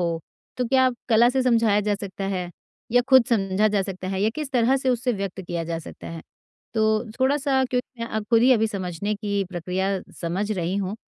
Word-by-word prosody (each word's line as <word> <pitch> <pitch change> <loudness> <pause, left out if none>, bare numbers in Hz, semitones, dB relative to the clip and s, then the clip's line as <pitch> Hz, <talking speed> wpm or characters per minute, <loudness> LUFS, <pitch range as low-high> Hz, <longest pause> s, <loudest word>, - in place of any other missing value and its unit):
हो 170 -2 -1 0.4
तो 250 - 0
क्या 260 0 +4 0.2
कला 235 +1 +5
से 265 - +1
समझाया 230 -4 +3
जा 210 0 0
सकता 195 -1 -6
है 180 -2 -3 0.4
या 245 - +6
खुद 260 -2 +7
समझा 195 -2 +2
जा 205 -1 +1
सकता 185 -1 -5
है 190 0 -2
या 220 - +3
किस 305 -3 -4
तरह 250 +2 +3
से 265 0 -1
उससे 250 0 0
व्यक्त 195 -2 -4
किया 175 -2 -4
जा 165 0 -3
सकता 165 - -10
है। 165 -1 -7 0.5
तो 220 - +2 0.4
थोड़ा-सा 270 0 +2
क्योंकि 250 -1 -3
अ, 220 -1 -3
खुद 230 -1 +5
ही 255 - +5
अभी 225 -2 +3
समझने 200 0 -3
की 200 -1 -2
प्रक्रिया 185 +2 -2 0.3
समझ 185 +5 -2
रही 185 -1 -2
हूँ। 200 +1 -2
210 Hz, 205 wpm, -24 LUFS, 190-245 Hz, 0.5 s, खुद